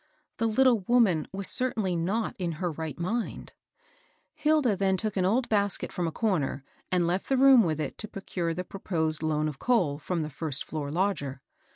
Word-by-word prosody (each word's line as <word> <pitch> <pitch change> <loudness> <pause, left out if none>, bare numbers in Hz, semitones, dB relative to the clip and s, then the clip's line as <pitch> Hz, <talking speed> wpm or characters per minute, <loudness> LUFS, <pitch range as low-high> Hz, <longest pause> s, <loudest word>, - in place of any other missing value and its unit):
The 230 - +1
little 245 +1 +4
woman 215 -11 +3
was 195 0 -1
certainly 220 -8 +1
not 195 +7 -1
in 175 -2 -1
her 175 +2 -2
right 160 -1 -5
mind. 220 +7 -3 0.8
Hilda 300 -8 +2
then 190 0 +1
took 215 +1 -1
an 185 -2 +1
old 235 +6 +2
basket 205 -2 0
from 175 -3 -2
a - - -2
comer, 160 - -1 0.3
and 180 -2 +2
left 180 +3 -1
the 270 - +3
room 265 -2 +7
with 160 -4 -1
it 155 - -4
to 215 - -4
procure 180 -4 -3
the 180 - -3
proposed 160 -5 -2
loan 155 -1 0
of 150 -3 -6
coal 180 -13 +1
from 165 +1 -2
the 150 - -6
first 150 -1 -3
floor 150 -2 -4
lodger. 145 -6 -1
185 Hz, 190 wpm, -28 LUFS, 160-220 Hz, 0.8 s, room